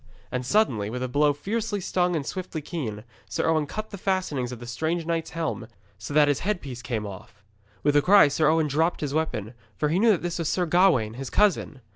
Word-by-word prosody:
And 125 0 -2
suddenly 125 - +1
with 125 +3 -4
a - - -1
blow 145 +3 +3
fiercely 205 +7 -2
strong 180 -1 0
and 150 -4 -2
swiftly 185 -2 -4
keen, 130 -10 -5 0.3
Sir 105 - -1
Owen 155 -2 +2
cut 215 +7 -6
the 200 - -7
fastenings 180 -11 -1
of 125 - -6
the 120 - -10
strange 160 +8 -2
knight's 165 -1 -2
helm, 165 -1 -3 0.3
so - - -7
that 150 -1 +7
the 145 -2 0
headpiece 145 - -3
came 115 -3 -3
off. 100 +1 -10 0.4
With 145 0 +2
a 145 - +6
cry 195 +1 +7
Sir 150 +2 +1
Owen 160 0 +3
dropped 160 +4 0
his 145 -2 -2
weapon, 125 -9 -2 0.2
for 150 - 0
he 170 +5 +1
knew 230 +2 +4
that 195 -6 +3
this 175 0 -3
was 165 - -1
Sir 180 - +1
Gawaine, 160 - +3
his 135 -2 -5
cousin. 185 -9 +1
155 Hz, 220 wpm, -25 LUFS, 130-180 Hz, 0.4 s, that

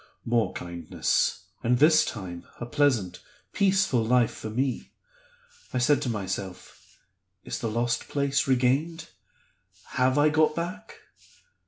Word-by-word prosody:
More 115 -1 +1
kindness; 85 -2 -1 0.2
and, 125 +1 +3
this 155 +3 +6
time, 90 -5 -6
a 120 - -4
pleasant, 120 - +1 0.3
peaceful 190 - +2
life 120 +1 +3
for 110 - -7
me. 130 +4 -2 0.8
I - - +2
said 135 +4 +3
to 125 - -2
myself, 95 -3 -6 0.5
'Is - - -5
the 115 - -2
lost 120 +2 -1
place 140 -1 0
regained? 135 +6 +1 0.8
Have 130 +1 +1
I 145 +1 +5
got 155 0 +2
back? 180 +6 -5
125 Hz, 125 wpm, -26 LUFS, 115-150 Hz, 0.8 s, this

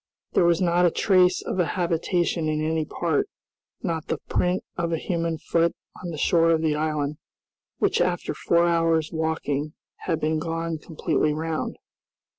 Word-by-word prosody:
There 175 - +3
was 170 -1 +4
not 175 0 +4
a - - +4
trace 185 0 +3
of 185 - -3
a - - +5
habitation 170 -1 0
in 155 0 0
any 160 0 0
part, 160 -1 0 0.6
not 160 -2 -2
the - - -1
print 180 +1 -1
of 170 -1 -1
a 165 - +1
human 165 -1 -2
foot 165 +1 +1 0.3
on 175 - -4
the 160 - -5
shore 165 +2 +3
of 165 -1 +2
the 155 -2 +2
island, 150 -1 -1 0.6
which - - +2
after - - 0
four 170 0 +2
hours' 165 -2 +2
walking 155 -2 -1 0.3
had 165 -3 +1
been 155 0 0
gone 165 0 -3
completely 150 -1 0
round. 160 0 -3
165 Hz, 165 wpm, -25 LUFS, 155-170 Hz, 0.6 s, a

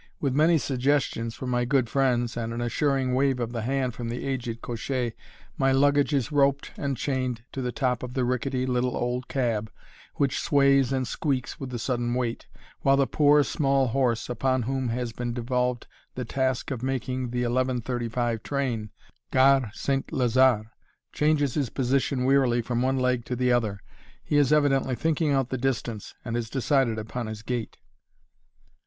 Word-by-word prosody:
With 140 -3 0
many 160 +4 +4
suggestions 130 -4 0
from 130 -1 -4
my 120 0 +1
good 130 -1 +2
friends 120 -2 +1
and 115 -1 -3
an 115 - -4
assuring 130 +2 0
wave 135 0 +2
of 120 -1 -2
the 115 -2 -3
hand 130 +1 -1
from 115 0 -5
the 120 +3 -4
aged 120 -4 -3
cocher, 120 +1 -2 0.5
my 135 0 +3
luggage 145 +2 +3
is 140 0 0
roped 140 -1 +2
and 140 -2 -2
chained 130 -3 -2
to 135 - -4
the 125 -1 -2
top 125 -2 0
of 125 0 -7
the 130 -2 +1
rickety, 125 +1 -1
little 125 0 0
old 125 +1 -2
cab, 115 -5 -1 0.4
which 140 -1 +1
sways 140 -3 +3
and 130 -2 0
squeaks 130 -5 -2
with 135 - -5
the 125 - -4
sudden 120 0 -1
weight, 120 -2 -2 0.3
while 135 0 +3
the 140 - +4
poor, 145 +1 +4
small 135 -3 +1
horse, 120 -2 0
upon 130 +1 0
whom 130 +1 -1
has 120 0 -3
been 120 +1 -3
devolved 125 0 -1 0.3
the 125 - -3
task 130 +2 -1
of 125 -4 -3
making 130 -1 -2
the 125 +1 -1
11.35 120 -2 -1
train, 125 -6 -2 0.4
Gare 135 -2 +4
St. 135 -1 -1
Lazare, 125 -3 +3 0.4
changes 150 -3 +2
his 140 -5 -1
position 130 0 0
wearily 130 -3 +3
from 120 0 -1
one 130 +1 +1
leg 125 -2 +1
to 125 - -3
the 125 0 +1
other. 110 -5 +1 0.4
He 145 - 0
is 145 -2 +4
evidently 135 -3 +3
thinking 160 +2 0
out 135 -3 +1
the 130 - -3
distance, 120 -4 -3
and 115 -1 -3
has 120 -2 -2
decided 135 -3 +1
upon 110 +2 -4
his 110 0 -7
gait. 120 -2 -4
125 Hz, 175 wpm, -26 LUFS, 120-135 Hz, 0.5 s, many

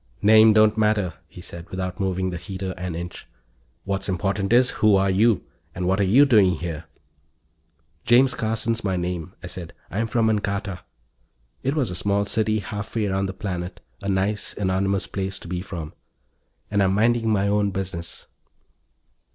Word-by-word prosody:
"Name 110 +1 +7
don't 110 0 +4
matter," 105 -5 +2
he 90 - -12
said 85 0 -9
without 95 +1 -4
moving 95 -1 -1
the 90 - -4
heater 95 +1 -5
an 90 -2 -5
inch. 85 +1 -7 0.6
"What's 95 0 -2
important 100 +2 -1
is, 125 +1 +5
who 110 -2 +6
are 95 0 +3
you? 110 +2 +3 0.3
And 90 -1 -3
what 95 +2 +1
are - - +3
you 145 - +8
doing 105 -9 +5
here?" 80 -1 -5 1.2
"James 125 +2 +5
Carson's 115 0 -1
my 95 -2 0
name," 90 0 -4
I - - -5
said. 90 -1 -7 0.2
"I'm 110 +4 -1
from 115 0 +1
Ancarta." 100 -3 -1 0.8
It 135 +3 -1
was 130 -10 0
a - - -4
small 100 +3 0
city 110 +1 0
halfway 105 +2 -3
around 95 0 0
the 95 - -5
planet, 90 -2 -5 0.2
a 100 - -3
nice, 100 +2 -1
anonymous 95 0 0
place 95 0 -3
to - - -9
be 90 +1 -3
from. 85 -5 -7 0.8
"And 100 -1 +2
I'm 95 0 +2
minding 115 +1 +2
my 100 -2 +2
own 100 0 +2
business." 95 -3 -5
100 Hz, 170 wpm, -23 LUFS, 90-110 Hz, 1.2 s, you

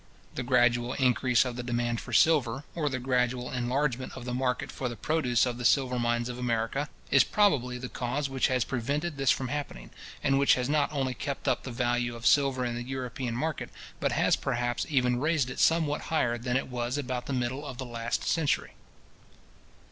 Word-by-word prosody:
The - - -3
gradual 120 0 +2
increase 125 -1 +3
of 125 -2 -4
the - - -2
demand 120 -1 -1
for 130 - -9
silver, 135 0 +3
or 155 -3 -1
the 130 - -2
gradual 125 -1 0
enlargement 130 +1 -1
of 120 - -8
the 125 - -3
market 125 0 -1
for 125 - -3
the 120 - -6
produce 125 -2 +1
of 125 -1 -3
the - - -4
silver 125 0 +3
mines 120 0 0
of 125 0 -6
America, 120 +4 -1 0.2
is 135 - +7
probably 135 - +2
the 125 0 -5
cause 125 +4 -2
which 135 -1 +1
has 130 -2 +1
prevented 140 +7 -2
this 135 -1 +1
from 130 -2 +1
happening, 145 - -5 0.3
and 135 0 +3
which 140 - +5
has 125 -1 -1
not 145 0 +1
only 135 -3 -1
kept 140 +3 -5
up - - +2
the 130 - -7
value 120 0 0
of 115 0 -9
silver 135 -3 +3
in 120 - -2
the 120 - -4
European 125 -1 -4
market, 155 +4 -2 0.3
but - - 0
has - - +3
perhaps 120 -2 -2
even 125 -4 +2
raised 150 -3 +1
it - - -7
somewhat 160 -3 +3
higher 125 -7 +1
than 125 +1 0
it 135 - -3
was 125 +1 -2
about 130 -3 -3
the - - -3
middle 130 +2 -2
of 135 -4 -7
the 130 - -5
last 120 -1 -3
century. 160 -4 0
125 Hz, 200 wpm, -28 LUFS, 120-140 Hz, 0.3 s, is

